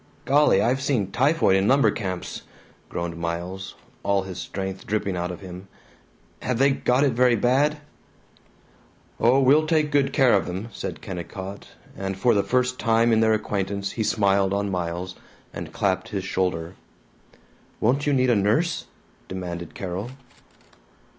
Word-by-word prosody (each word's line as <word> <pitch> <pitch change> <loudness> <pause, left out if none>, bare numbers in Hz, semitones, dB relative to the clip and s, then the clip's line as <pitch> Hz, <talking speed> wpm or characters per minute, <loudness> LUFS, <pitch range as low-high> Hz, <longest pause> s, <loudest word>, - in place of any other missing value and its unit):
"Golly, 140 -8 +4
I've 130 +3 +1
seen 120 -9 0
typhoid 135 -6 +3
in 95 +1 +2
lumber 130 -4 +4
camps," 95 -4 -5 0.5
groaned 85 -1 -4
Miles, 85 +4 -4 0.3
all 100 -1 +1
the 95 -1 -7
strength 95 +1 -5
dripping 100 -3 -1
out 90 0 -2
of 90 0 -7
him. 90 0 -9 0.7
"Have 125 -2 -1
they 135 +2 +4
got 130 0 +2
it 140 -3 +2
very 125 0 +4
bad?" 135 +7 +2 1.4
"Oh, 125 +4 +4
we'll 145 +4 +4
take 155 -2 +2
good 140 -1 +2
care 130 -4 +4
of 100 - +2
them," 95 +6 -5
said - - -6
Kennicott, 95 +2 -7 0.3
and 95 -1 -4
for 120 +4 +3
the 100 - +3
first 125 +3 0
time 115 0 +3
in 110 - +4
their 110 0 +4
acquaintance 100 -2 -2
he 110 - -2
smiled 100 -2 +2
on 100 0 -1
Miles 90 0 -3 0.4
and - - -7
clapped 95 -2 -1
his 100 -3 -3
shoulder. 90 -3 -2 1.1
"Won't 135 +6 +1
you - - +3
need 130 -2 +3
a - - +4
nurse?" 135 - +1 0.4
demanded 85 -3 -6
Carol. 95 +4 -4
100 Hz, 155 wpm, -24 LUFS, 95-125 Hz, 1.4 s, Golly